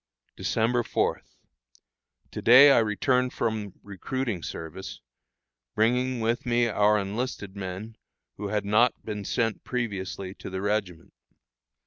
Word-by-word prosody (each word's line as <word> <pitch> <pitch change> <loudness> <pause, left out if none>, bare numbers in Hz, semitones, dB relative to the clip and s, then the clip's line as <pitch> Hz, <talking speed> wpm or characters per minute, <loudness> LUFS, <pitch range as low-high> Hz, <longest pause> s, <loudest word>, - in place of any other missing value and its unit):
December 115 +2 +1
4. - - -1 1.1
To - - -6
day 135 +4 +8
I - - +6
returned 125 +4 +1
from 110 -4 -2
recruiting 105 +1 -4
service, 80 +4 -7 0.8
bringing 125 +3 +1
with 115 +2 0
me 120 -1 +2
our 105 -1 +3
enlisted 100 0 -4
men 100 +3 -6 0.4
who 105 - -4
had 105 0 -1
not 110 +4 +2
been 105 -2 -4
sent 115 +1 -1
previously 100 -6 -4
to - - -9
the 95 0 -4
regiment. 100 -4 -2
110 Hz, 120 wpm, -26 LUFS, 100-120 Hz, 1.1 s, day